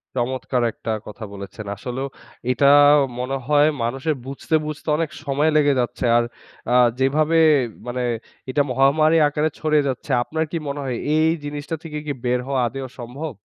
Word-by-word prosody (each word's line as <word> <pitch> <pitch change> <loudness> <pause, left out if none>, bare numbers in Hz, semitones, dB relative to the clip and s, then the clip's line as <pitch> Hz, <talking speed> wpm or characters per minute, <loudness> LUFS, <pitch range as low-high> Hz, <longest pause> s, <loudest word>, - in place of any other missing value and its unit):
চমৎকার 125 0 -1
একটা 110 - -5 0.2
কথা 105 +1 -9
বলেছেন! 100 +2 -8
আসলেও 125 +6 -4 0.4
এটা 125 +3 +1 0.5
মনে 125 +2 -2
হয় 150 0 +5 0.2
মানুষের 135 +6 -1
বুঝতে, 140 +4 -2
বুঝতে 155 +1 -7
অনেক 165 -1 -1
সময় 145 +1 +1
লেগে 145 -1 +4
যাচ্ছে। 125 +1 -2
আর 120 - +3 0.5
আ - - +3 0.3
যেভাবে 155 +5 +2 0.5
মানে 125 +1 -3 0.5
এটা 145 +3 +2
মহামারী 145 +5 +4
আকারে 150 +2 0
ছড়িয়ে 155 -1 +2
যাচ্ছে 130 +2 -5
আপনার 160 +5 -2
কি 170 - -1
মনে 140 +1 -3
হয় 130 -3 -2 0.2
এই 155 +1 +4
জিনিসটা 145 +2 -4
থেকে 155 -2 -6
কি 145 - -2
বের 125 0 +2
হওয়া 135 -2 0
আদৌ 135 +3 -5
সম্ভব? 135 +6 -6
140 Hz, 160 wpm, -22 LUFS, 125-150 Hz, 0.5 s, হয়